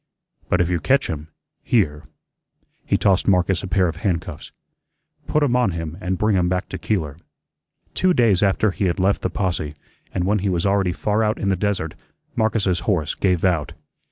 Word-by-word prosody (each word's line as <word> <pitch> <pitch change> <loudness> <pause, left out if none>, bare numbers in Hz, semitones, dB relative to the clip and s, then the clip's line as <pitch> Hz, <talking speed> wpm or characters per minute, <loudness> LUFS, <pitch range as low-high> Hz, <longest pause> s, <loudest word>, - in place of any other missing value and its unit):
But - - +3
if 85 - +2
you 90 -1 0
catch 135 - +2
him, 75 -1 -6 0.3
here" 75 -11 +1 0.8
he - - +2
tossed 95 -2 +2
Marcus 90 -1 +2
a 100 - -5
pair 95 -1 +2
of 85 -1 -4
handcuffs 90 -2 -3 0.8
"put 150 - +2
'em 125 -4 +2
on 125 -7 +2
him 80 -1 -5
and 90 0 -1
bring 105 +1 +2
him 90 -1 +2
back 90 +1 -2
to - - -5
Keeler." 80 -9 -2 0.8
Two 185 - +2
days 115 - +3
after 100 +1 +2
he 95 - -2
had 85 - 0
left 95 +2 +2
the - - -1
posse, 85 -6 -2 0.4
and 90 - -1
when 105 +3 +1
he 100 +1 -1
was 85 -1 0
already 100 -2 +2
far 105 +4 0
out 110 0 +1
in 100 - -1
the 95 - +2
desert, 95 -5 -1 0.4
Marcus's 100 -5 +1
horse 80 -8 0
gave 90 -2 +1
out. 85 -6 0
95 Hz, 190 wpm, -22 LUFS, 85-105 Hz, 0.8 s, But